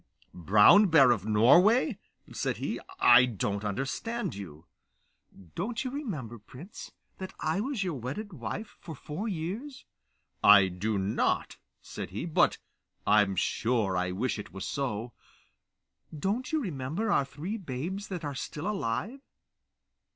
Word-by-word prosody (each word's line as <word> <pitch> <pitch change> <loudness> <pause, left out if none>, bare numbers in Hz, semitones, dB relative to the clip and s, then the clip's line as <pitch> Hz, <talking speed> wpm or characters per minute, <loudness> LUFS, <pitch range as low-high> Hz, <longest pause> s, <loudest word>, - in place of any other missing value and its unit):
'Brown 105 - +6
Bear 140 -7 +6
of 110 -4 -1
Norway!' 185 - +4 0.3
said - - -2
he. - - -3 0.2
'I 125 +1 +8
don't 100 -2 -3
understand 135 - -3
you.' 85 -5 -10 0.9
'Don't 230 +7 -3
you 255 - -4
remember, 155 - -5
prince, 135 - -11 0.3
that 190 0 -7
I 160 +4 -1
was 240 -1 -2
your 180 -3 -2
wedded 145 - -6
wife 165 - -6
for 160 -2 -9
four 155 - -6
years?' 210 - -5 0.6
'I 100 -2 +8
do 100 +4 -2
not,' 95 +2 -1 0.3
said - - -7
he, 100 - -5
'but 165 - +2 0.5
I'm 105 -2 +3
sure 110 0 0
I 90 0 0
wish 105 +6 -2
it 105 - -8
was 95 +2 -6
so.' 120 -4 -3 1.0
'Don't 205 - -2
you 315 - +1
remember 165 - -3
our - - +3
three 155 +10 -6
babes 180 - -5
that 180 -5 -5
are 145 - -3
still 150 +5 -5
alive? 195 - -2
140 Hz, 135 wpm, -29 LUFS, -, 1.0 s, I